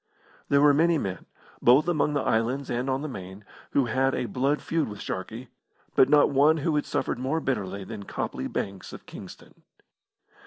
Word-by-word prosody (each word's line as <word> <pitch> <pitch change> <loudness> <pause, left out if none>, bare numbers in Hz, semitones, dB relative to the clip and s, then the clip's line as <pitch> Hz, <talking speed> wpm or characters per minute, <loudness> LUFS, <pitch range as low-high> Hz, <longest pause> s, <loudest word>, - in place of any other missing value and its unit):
There 140 0 +4
were 145 -1 +7
many 165 +3 +3
men, 95 -9 -4 0.3
both 130 +7 +5
among 150 -3 +1
the 145 - +1
islands 125 +5 0
and 125 +3 -1
on 135 +2 -1
the - - -3
Main, 95 -5 -9 0.3
who 140 - +3
had 130 +3 +1
a - - -1
blood 135 +5 0
feud 165 -2 -1
with 105 - -8
Sharkey, 110 +6 -6 0.5
but 130 - +5
not 145 0 +5
one 145 +3 +4
who 155 +1 0
had 150 - 0
suffered - - -2
more 135 +6 -1
bitterly 100 -9 -3
than 100 0 -8
Copley 65 - -4
Banks, 95 -1 -5
of - - -10
Kingston. - - -12
130 Hz, 185 wpm, -26 LUFS, 110-145 Hz, 0.5 s, were